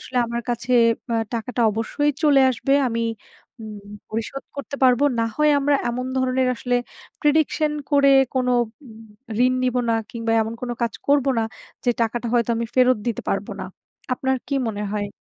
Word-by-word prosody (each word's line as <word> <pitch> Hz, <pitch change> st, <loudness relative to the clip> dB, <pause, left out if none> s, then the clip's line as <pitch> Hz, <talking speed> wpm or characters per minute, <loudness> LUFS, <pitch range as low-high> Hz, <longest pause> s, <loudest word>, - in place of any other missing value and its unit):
আসলে 255 Hz, -, -8 dB
আমার 235 Hz, +1 st, -3 dB
কাছে 240 Hz, +1 st, -2 dB, 0.4 s
অ্যা 230 Hz, -, 0 dB, 0.2 s
টাকাটা 235 Hz, +2 st, -3 dB
অবশ্যই 230 Hz, +7 st, 0 dB
চলে 290 Hz, -3 st, +5 dB
আসবে। 270 Hz, +3 st, 0 dB
আমি 230 Hz, 0 st, -1 dB, 0.6 s
উম 215 Hz, -1 st, -8 dB, 0.3 s
পরিশোধ 230 Hz, +5 st, -4 dB
করতে 280 Hz, 0 st, -5 dB
পারবো। 255 Hz, +2 st, +4 dB, 0.2 s
না 230 Hz, -, +1 dB
হয় 300 Hz, 0 st, +4 dB
আমরা 285 Hz, +1 st, +2 dB
এমন 250 Hz, +2 st, -3 dB
ধরনের 260 Hz, 0 st, +1 dB
আসলে 245 Hz, +1 st, 0 dB, 0.4 s
prediction 305 Hz, 0 st, +2 dB, 0.2 s
করে 280 Hz, -1 st, +5 dB, 0.2 s
কোনো 250 Hz, -1 st, +1 dB, 0.3 s
উম 225 Hz, -1 st, -13 dB, 0.4 s
ঋণ 255 Hz, -, +2 dB
নিবো 250 Hz, 0 st, +1 dB
না -, -, +3 dB, 0.2 s
কিংবা 230 Hz, -1 st, -2 dB
এমন 220 Hz, +1 st, -5 dB
কোনো 240 Hz, -1 st, -3 dB
কাজ 235 Hz, -, 0 dB, 0.2 s
করবো 280 Hz, -1 st, +3 dB
না, 225 Hz, -, +1 dB, 0.4 s
যে 245 Hz, -, +3 dB
টাকাটা 235 Hz, +2 st, -2 dB
হয়তো 235 Hz, -1 st, +2 dB
আমি 230 Hz, 0 st, -2 dB
ফেরত 255 Hz, -2 st, +4 dB
দিতে 235 Hz, -3 st, -2 dB
পারবো 195 Hz, +1 st, -2 dB
না। -, -, -5 dB, 0.5 s
আপনার 265 Hz, +1 st, 0 dB
কি 280 Hz, -, -1 dB
মনে 210 Hz, -1 st, -3 dB
হয়? 205 Hz, -1 st, -2 dB
245 Hz, 175 wpm, -22 LUFS, 230-275 Hz, 0.6 s, চলে